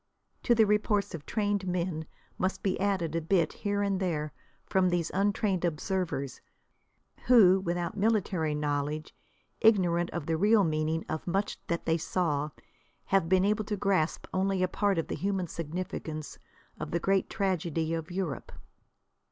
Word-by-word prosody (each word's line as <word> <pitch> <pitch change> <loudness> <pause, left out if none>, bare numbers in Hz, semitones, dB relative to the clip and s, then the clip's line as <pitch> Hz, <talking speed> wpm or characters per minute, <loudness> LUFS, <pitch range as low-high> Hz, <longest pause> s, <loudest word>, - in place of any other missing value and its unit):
To 240 - +3
the 220 -1 +5
reports 205 -1 +1
of 155 -3 -7
trained 205 -3 0
men 175 -3 -2 0.3
must 185 +1 -1
be 190 -2 0
added 190 -5 0
a 165 - +1
bit 165 0 +1
here 205 -1 -1
and 195 -2 0
there 155 -6 -2 0.3
from 185 -1 +2
these 175 -2 0
untrained 195 -1 +1
observers, 170 - -2 0.9
who 200 -7 +7
without 175 -2 -2
military 195 -7 +1
knowledge, 150 +1 -2 0.5
ignorant 175 -6 +4
of 170 -4 -4
the 160 0 0
real 210 +3 +5
meaning 155 0 0
of 155 +2 -4
much 195 +4 -1
that 170 0 -2
they 165 0 +2
saw, 150 -4 0 0.6
have 190 -4 +2
been 190 0 +4
able 210 +1 +1
to 210 0 -2
grasp 190 -5 +1
only 190 0 +1
a - - +3
part 200 0 0
of 165 - -1
the - - -4
human 195 -1 -1
significance 160 -2 -5 0.4
of - - -4
the 170 - 0
great 195 +2 +1
tragedy 170 -5 -1
of 165 -1 -3
Europe. 175 -7 -4
180 Hz, 155 wpm, -29 LUFS, 160-195 Hz, 0.9 s, who